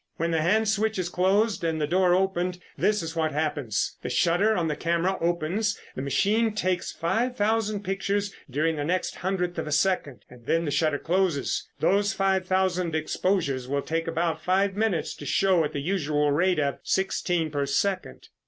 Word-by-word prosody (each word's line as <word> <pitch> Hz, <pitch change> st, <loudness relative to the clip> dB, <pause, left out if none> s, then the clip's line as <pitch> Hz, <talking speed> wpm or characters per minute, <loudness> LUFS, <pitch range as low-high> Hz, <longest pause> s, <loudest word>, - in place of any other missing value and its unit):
When 165 Hz, +1 st, -1 dB
the 160 Hz, -1 st, +1 dB
hand 215 Hz, +7 st, +2 dB
switch 220 Hz, 0 st, +1 dB
is 180 Hz, -2 st, -2 dB
closed 195 Hz, +4 st, +1 dB
and 160 Hz, -1 st, 0 dB
the 150 Hz, -, +1 dB
door 180 Hz, +3 st, +3 dB
opened, 185 Hz, -1 st, 0 dB, 0.2 s
this 210 Hz, -4 st, +1 dB
is 165 Hz, +1 st, -5 dB
what 160 Hz, -2 st, 0 dB
happens. 145 Hz, -7 st, -1 dB
The 125 Hz, -, -4 dB
shutter 175 Hz, -, +2 dB
on 170 Hz, -3 st, 0 dB
the 150 Hz, -, -1 dB
camera 170 Hz, +4 st, 0 dB
opens, 175 Hz, +5 st, 0 dB, 0.2 s
the -, -, -4 dB
machine 205 Hz, -, +1 dB
takes 185 Hz, -3 st, -1 dB
five 225 Hz, +9 st, -1 dB
thousand 210 Hz, -1 st, 0 dB
pictures 200 Hz, +1 st, -1 dB, 0.2 s
during 155 Hz, +4 st, 0 dB
the 145 Hz, -, -2 dB
next 180 Hz, +4 st, -1 dB
hundredth 180 Hz, -1 st, -2 dB
of -, -, -4 dB
a -, -, -4 dB
second, 150 Hz, -, 0 dB
and 120 Hz, -1 st, -16 dB
then 165 Hz, +1 st, +1 dB
the 145 Hz, -, -2 dB
shutter 155 Hz, -1 st, +1 dB
closes. 175 Hz, -3 st, 0 dB
Those 200 Hz, +4 st, +2 dB
five 190 Hz, -1 st, +1 dB
thousand 185 Hz, -3 st, +1 dB
exposures 155 Hz, -5 st, 0 dB
will 140 Hz, +1 st, -1 dB
take 165 Hz, +1 st, -2 dB
about 165 Hz, 0 st, -1 dB
five 195 Hz, +1 st, +1 dB
minutes 205 Hz, -6 st, 0 dB
to 145 Hz, -, -9 dB
show 185 Hz, +1 st, +3 dB
at 150 Hz, -, -2 dB
the 145 Hz, -, -3 dB
usual 150 Hz, -4 st, 0 dB
rate 180 Hz, +5 st, +2 dB
of 140 Hz, -2 st, 0 dB
sixteen 175 Hz, -4 st, 0 dB
per 140 Hz, -1 st, -1 dB
second." 185 Hz, +7 st, -2 dB
175 Hz, 185 wpm, -26 LUFS, 155-195 Hz, 0.2 s, door